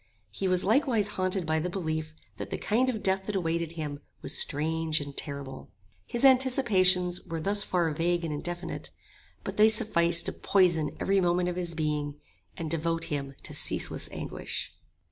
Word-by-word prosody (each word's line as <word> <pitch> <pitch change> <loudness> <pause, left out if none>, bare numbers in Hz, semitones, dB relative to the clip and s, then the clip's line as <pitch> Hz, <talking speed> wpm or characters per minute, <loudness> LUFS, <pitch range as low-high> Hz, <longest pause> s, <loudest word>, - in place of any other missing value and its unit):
He 195 - -2
was 185 0 +2
likewise 225 -2 +2
haunted 185 -2 0
by 160 0 +1
the 175 +3 -2
belief 160 -4 -3 0.2
that - - -6
the - - -3
kind 245 +5 +1
of 220 -4 -3
death 190 0 +1
that 210 - -2
awaited 170 -2 -1
him 150 -3 -5 0.2
was - - 0
strange 160 +1 +2
and 145 -1 -7
terrible. 140 -2 -5 0.4
His 240 +3 0
anticipations 200 -9 +4
were 165 -1 -3
thus 200 +5 +1
far 175 -5 0
vague 170 +2 0
and 155 - -3
indefinite; 175 +4 -5 0.5
but - - -5
they 215 +1 +7
sufficed 170 -7 +3
to - - -1
poison 165 -6 +2
every 195 0 +2
moment 175 0 +2
of 175 - -3
his 175 -2 -3
being, 150 -2 -2 0.4
and 165 - -4
devote 165 0 0
him 140 -1 -4
to - - -2
ceaseless - - 0
anguish. - - -5
175 Hz, 170 wpm, -28 LUFS, 160-195 Hz, 0.5 s, they